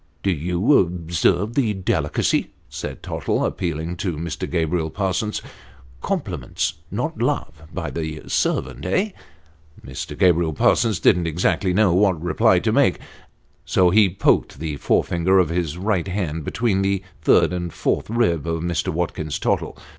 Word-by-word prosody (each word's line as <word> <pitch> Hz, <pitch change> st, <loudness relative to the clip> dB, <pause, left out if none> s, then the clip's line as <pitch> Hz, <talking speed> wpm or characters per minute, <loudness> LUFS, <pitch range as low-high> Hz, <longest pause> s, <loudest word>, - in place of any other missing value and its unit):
"Do 100 Hz, -, +2 dB
you 90 Hz, -, +2 dB
observe 90 Hz, +4 st, 0 dB
the 115 Hz, -6 st, +1 dB
delicacy?" 95 Hz, -1 st, 0 dB, 0.2 s
said -, -, -7 dB
Tottle, -, -, -1 dB
appealing 85 Hz, 0 st, -3 dB
to 90 Hz, -3 st, -3 dB
Mr. 85 Hz, 0 st, -4 dB
Gabriel 80 Hz, -1 st, 0 dB
Parsons. 100 Hz, +4 st, -2 dB, 0.3 s
" 65 Hz, +1 st, -24 dB
Compliments 95 Hz, -, -2 dB, 0.2 s
not -, -, -3 dB
love, 75 Hz, -, -1 dB
by 90 Hz, -3 st, -4 dB
the 80 Hz, -2 st, -5 dB
servant, -, -, -1 dB
eh? 190 Hz, -, 0 dB, 0.4 s
" 75 Hz, 0 st, -23 dB
Mr. 65 Hz, -1 st, -6 dB
Gabriel 85 Hz, -3 st, +3 dB
Parsons 110 Hz, +6 st, +2 dB
didn't 90 Hz, -3 st, +3 dB
exactly 90 Hz, +3 st, +1 dB
know 95 Hz, -1 st, +3 dB
what 95 Hz, -2 st, +3 dB
reply 85 Hz, -, +3 dB
to -, -, +1 dB
make, -, -, +3 dB, 0.7 s
so 90 Hz, -2 st, +3 dB
he 105 Hz, 0 st, +5 dB
poked 90 Hz, -5 st, +1 dB
the 75 Hz, 0 st, -4 dB
forefinger 85 Hz, +6 st, +2 dB
of 90 Hz, -4 st, +3 dB
his 85 Hz, -2 st, -2 dB
right 95 Hz, -1 st, 0 dB
hand 85 Hz, -5 st, -3 dB
between 110 Hz, -5 st, 0 dB
the 95 Hz, -1 st, 0 dB, 0.2 s
third -, -, +4 dB
and 85 Hz, -2 st, -3 dB
fourth -, -, -1 dB
ribs 85 Hz, -, +1 dB
of 80 Hz, 0 st, -2 dB
Mr. 85 Hz, +1 st, -1 dB
Watlrins 80 Hz, -3 st, -2 dB
Tottle. -, -, -1 dB
90 Hz, 150 wpm, -22 LUFS, 80-95 Hz, 0.7 s, he